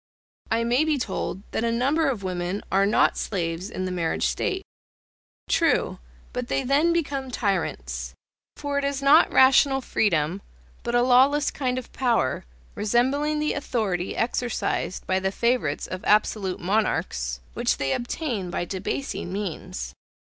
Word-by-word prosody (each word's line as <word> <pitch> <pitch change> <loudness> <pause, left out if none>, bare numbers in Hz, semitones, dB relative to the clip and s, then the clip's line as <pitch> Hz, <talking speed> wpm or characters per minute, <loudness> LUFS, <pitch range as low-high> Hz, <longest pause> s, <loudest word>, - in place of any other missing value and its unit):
I 230 +1 +1
may 245 +5 +3
be 310 -2 +1
told 195 -5 -3
that - - -1
a 230 - +1
number 275 +6 +2
of 225 -7 -3
women 180 +1 -3
are 195 +1 +3
not 210 - +3
slaves 175 -1 -2
in 185 -4 -4
the 185 - -3
marriage 170 - 0
state. 60 0 -1 0.8
True, - - +2 0.3
but 250 -1 -3
they 270 - 0
then 285 +6 +3
become 285 -6 -1
tyrants; 65 - -2 0.4
for 285 -1 -1
it - - -3
is 280 0 -1
not 295 +4 +6
rational 270 +1 +5
freedom, 185 - 0 0.4
but 235 0 -2
a 240 - +4
lawless 270 +4 +4
kind 255 -2 -2
of 255 - -7
power, 235 - +1 0.3
resembling 265 +8 +1
the 300 0 0
authority 205 -10 -2
exercised 240 -5 -1
by 190 0 +1
the 190 0 -1
favourites 235 - 0
of 185 +1 -6
absolute 210 -3 +2
monarchs, 170 - -1
which - - 0
they 135 -1 0
obtain 240 - -3
by 175 - -2
debasing 195 +1 -4
means. 160 - -5
225 Hz, 145 wpm, -25 LUFS, 185-270 Hz, 0.8 s, not